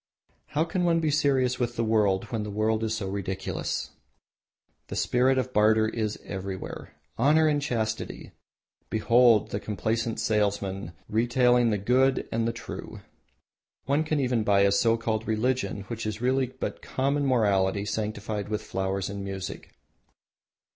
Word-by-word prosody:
How 155 - 0
can 180 +2 -2
one 170 -1 +3
be 155 -2 +1
serious 135 -4 +2
with 120 -1 -1
the 115 - 0
world 105 -4 +2
when 115 -2 -1
the 105 - -4
world 110 +2 0
itself - - +1
is 110 0 -2
so 95 -3 -4
ridiculous! 95 -1 -3 1.0
The - - -6
spirit 130 +2 +2
of 130 0 -1
barter 110 +1 +4
is 110 -1 -2
everywhere. 95 -1 -6 0.2
Honour 150 +5 +4
and 145 -1 +1
Chastity! 110 -5 -3 0.6
Behold 115 0 +4
the 100 - -2
complacent 110 +2 -2
salesman 100 -4 -1
retailing 120 +1 +3
the 105 - +1
Good 130 +6 +2
and 115 0 0
True. 115 - -8 0.8
One 140 +4 +2
can 155 -1 -1
even 125 -4 +1
buy 100 -2 +3
a 100 0 +4
so 115 +3 +3
called 110 -1 -2
Religion, 115 0 0
which 110 +2 -5
is 110 0 -4
really 130 +2 +1
but 130 +1 -6
common 140 +2 0
morality 100 -5 +2
sanctified 105 0 -3
with 105 -1 -2
flowers 95 0 -2
and 100 0 -5
music. 95 -1 -6
110 Hz, 150 wpm, -27 LUFS, 105-125 Hz, 1.0 s, barter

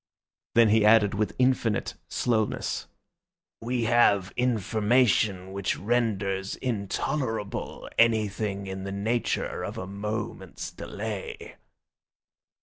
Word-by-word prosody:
Then 115 -1 +6
he 110 0 +4
added 105 -1 +5
with 105 +1 -1
infinite 125 -4 +1
slowness, 110 -3 -1 0.7
"We 120 +1 -1
have 105 -5 +3
information 110 -4 +2
which 100 0 -1
renders 100 -4 0
intolerable 110 0 -3
anything 105 -3 +2
in 95 0 -5
the 95 - -4
nature 110 +5 -1
of - - -5
a 95 - -4
moment's 105 +3 -5
delay." 105 -1 -6
105 Hz, 95 wpm, -27 LUFS, 100-115 Hz, 0.7 s, Then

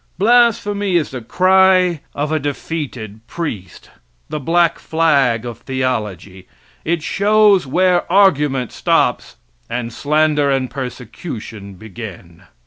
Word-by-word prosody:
Blasphemy 205 -3 +2
is 165 -3 +1
the 130 -2 -6
cry 185 +3 +3
of 145 +1 -2
a 155 - +1
defeated 140 -7 -5
priest 110 - -7 0.4
the 150 - -4
black 170 +3 +1
flag 140 -8 +1
of 120 -1 -7
theology 105 -8 -4 0.4
it 165 -1 -1
shows 205 -3 +3
where 180 +4 +1
argument 150 - +2
stops - - 0 0.3
and 120 -1 -4
slander 150 0 +1
and 130 -3 -1
persecution 115 - -8
begin. 95 -4 -10
145 Hz, 110 wpm, -18 LUFS, 115-175 Hz, 0.4 s, cry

